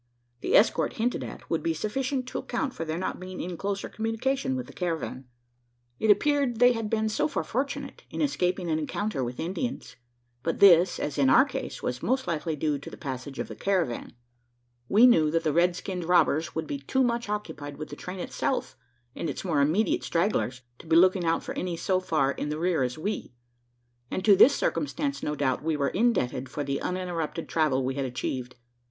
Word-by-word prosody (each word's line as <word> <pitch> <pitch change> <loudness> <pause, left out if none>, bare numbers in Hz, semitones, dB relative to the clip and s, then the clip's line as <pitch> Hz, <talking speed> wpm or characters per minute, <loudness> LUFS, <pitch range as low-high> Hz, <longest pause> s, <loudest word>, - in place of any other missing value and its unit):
The - - 0
escort, 215 - +3
hinted 240 +2 -1
at, - - -9
would - - -1
be 330 -1 0
sufficient 260 +4 -2
to - - -3
account 280 -5 -2
for - - -4
their 160 +1 -3
not 185 - -3
being 185 0 -7
in 180 0 -4
closer 200 +3 -3
communication 260 +4 -1
with 255 -1 -3
the - - -13
caravan. 165 -7 -3 0.7
It 220 - +1
appeared, 275 +3 +3
they 245 +2 +6
had 225 -2 -3
been 220 0 +1
so 210 -8 +1
far 160 - -2
fortunate 265 - -3
in - - -6
escaping 185 - 0
an 155 - +1
encounter 155 -1 -2
with 125 0 -5
Indians; 195 - -4 0.4
but 165 +5 -1
this, 180 -2 +6
as 145 -1 -3
in 135 -2 +4
our - - +7
case, - - -6
was 125 0 -2
most 260 +2 0
likely 160 -1 -2
due 150 -1 -1
to - - -9
the - - -10
passage 135 0 -6
of - - -3
the - - -8
caravan. 180 -11 -1 0.8
We 220 +5 +7
knew 160 -12 +5
that 165 +1 0
the 155 -2 +1
red 175 +1 +3
skinned 180 -1 -4
robbers 170 -2 +2
would 160 - -2
be 285 - -4
too 265 0 +1
much 235 -2 -1
occupied 155 -9 -5
with 155 - -6
the 145 - -7
train 180 +5 -7
itself - - -2 0.4
and 165 - -3
its - - -5
more 155 -6 +2
immediate 215 - +2
stragglers, 165 - 0 0.2
to - - -13
be 160 - +3
looking 185 +1 +5
out 165 0 +1
for - - -5
any 180 -2 -3
so 185 +2 +1
far 155 -7 +1
in 150 - -4
the 150 - -2
rear 170 -2 +1
as 125 +1 -1
we; 195 - -4 0.8
and 185 - -3
to 205 -2 +7
this 280 +9 +7
circumstance, 285 -1 -1
no 150 - -2
doubt, 135 -3 0
were 150 -3 0
we - - -2
indebted 135 - +1
for 145 - -3
the 140 0 -2
uninterrupted 175 -3 -3
travel 140 -5 +1
we 130 - -1
had 135 0 -2
achieved. 125 0 -4
175 Hz, 205 wpm, -27 LUFS, 150-220 Hz, 0.8 s, our